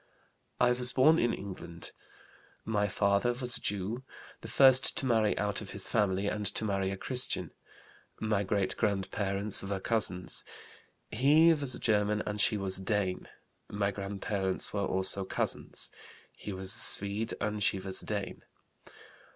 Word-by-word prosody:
"I 125 Hz, -, +4 dB
was 125 Hz, 0 st, +2 dB
born 155 Hz, +5 st, +5 dB
in 120 Hz, -, +2 dB
England. 85 Hz, -4 st, -7 dB, 0.7 s
My 105 Hz, -2 st, 0 dB
father 100 Hz, +4 st, +1 dB
was 125 Hz, 0 st, -2 dB
a -, -, -2 dB
Jew, 100 Hz, +5 st, -2 dB, 0.4 s
the -, -, -8 dB
first 130 Hz, -1 st, +6 dB
to -, -, +1 dB
marry 110 Hz, -4 st, +2 dB
out 105 Hz, 0 st, -1 dB
of 105 Hz, -, -8 dB
his 100 Hz, -, +1 dB
family 100 Hz, -3 st, 0 dB
and 105 Hz, +1 st, -2 dB
to 100 Hz, +3 st, 0 dB
marry 95 Hz, -2 st, -1 dB
a 95 Hz, -, -4 dB
Christian. 125 Hz, +5 st, 0 dB, 0.7 s
My 110 Hz, -2 st, 0 dB
great 100 Hz, -1 st, -1 dB
grandparents 100 Hz, -1 st, -1 dB
were 100 Hz, 0 st, -4 dB
cousins; 95 Hz, -4 st, -2 dB, 0.7 s
he 150 Hz, +8 st, +5 dB
was 140 Hz, -5 st, -2 dB
a -, -, -8 dB
German 105 Hz, -1 st, +1 dB
and 105 Hz, 0 st, -2 dB
she 105 Hz, -, +3 dB
was 95 Hz, -1 st, -3 dB
a -, -, -8 dB
Dane. 95 Hz, -2 st, -2 dB, 0.4 s
My 100 Hz, -1 st, -1 dB
grandparents 100 Hz, -1 st, -3 dB
were 100 Hz, -1 st, -1 dB
also 95 Hz, +1 st, +3 dB
cousins; 95 Hz, -, -2 dB, 0.4 s
he 105 Hz, -, -8 dB
was 95 Hz, 0 st, -2 dB
a -, -, -2 dB
Swede 100 Hz, +3 st, +3 dB
and 105 Hz, 0 st, -3 dB
she 100 Hz, -, +2 dB
was 95 Hz, 0 st, -5 dB
a -, -, -12 dB
Dane. 100 Hz, -2 st, -4 dB
105 Hz, 160 wpm, -30 LUFS, 95-115 Hz, 0.7 s, first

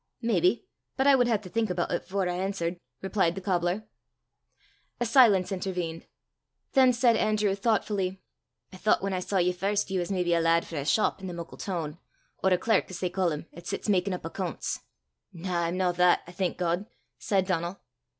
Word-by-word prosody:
"Maybe; 210 Hz, -, +2 dB, 0.3 s
but 265 Hz, -, +2 dB
I 280 Hz, -, +7 dB
wud 250 Hz, -2 st, +4 dB
hae 230 Hz, -2 st, +3 dB
to 200 Hz, -, -12 dB
think 220 Hz, +3 st, -1 dB
aboot 175 Hz, -1 st, -1 dB
it 175 Hz, -, -2 dB
afore 190 Hz, -1 st, -1 dB
I 180 Hz, -, -1 dB
answert," 185 Hz, -2 st, -2 dB, 0.3 s
replied 190 Hz, -3 st, +1 dB
the -, -, -4 dB
cobbler. 180 Hz, +2 st, 0 dB, 1.1 s
A 240 Hz, -, +1 dB
silence 225 Hz, -6 st, +5 dB
intervened. 180 Hz, -3 st, -3 dB, 0.7 s
Then 260 Hz, -2 st, +6 dB
said 240 Hz, -1 st, +3 dB
Andrew, 215 Hz, -2 st, +2 dB
thoughtfully, 195 Hz, -3 st, 0 dB, 0.5 s
"I -, -, -9 dB
thoucht, 205 Hz, 0 st, +2 dB
whan 195 Hz, 0 st, -1 dB
I 185 Hz, -, 0 dB
saw 195 Hz, +2 st, -2 dB
ye 180 Hz, 0 st, +3 dB
first, 200 Hz, +2 st, -1 dB
ye 190 Hz, -, +1 dB
was 175 Hz, -, -2 dB
maybe 180 Hz, -2 st, +1 dB
a 170 Hz, -, +3 dB
lad 165 Hz, 0 st, +3 dB
frae 160 Hz, -, -5 dB
a -, -, -6 dB
shop 205 Hz, +9 st, +2 dB
i' 190 Hz, -, -5 dB
the 175 Hz, -, -5 dB
muckle 170 Hz, -1 st, -8 dB
toon 165 Hz, -4 st, -4 dB, 0.4 s
or 190 Hz, -, +5 dB
a 180 Hz, -, +5 dB
clerk, 220 Hz, +5 st, +2 dB
as 185 Hz, -, -6 dB
they 180 Hz, -1 st, -1 dB
ca' 185 Hz, -1 st, +1 dB
them, 150 Hz, 0 st, -4 dB
'at 170 Hz, +1 st, -11 dB
sits -, -, -4 dB
makin' 195 Hz, 0 st, +2 dB
up -, -, -9 dB
accoonts." 175 Hz, +1 st, -3 dB, 0.5 s
"Na, 175 Hz, 0 st, -2 dB
I'm 170 Hz, +2 st, -2 dB
no 185 Hz, -1 st, +2 dB
that, 180 Hz, 0 st, +4 dB
I 175 Hz, -, -11 dB
thank 180 Hz, 0 st, -2 dB
God," 175 Hz, +3 st, -1 dB, 0.3 s
said 195 Hz, -2 st, +1 dB
Donal. 175 Hz, 0 st, -2 dB
185 Hz, 205 wpm, -28 LUFS, 175-200 Hz, 1.1 s, I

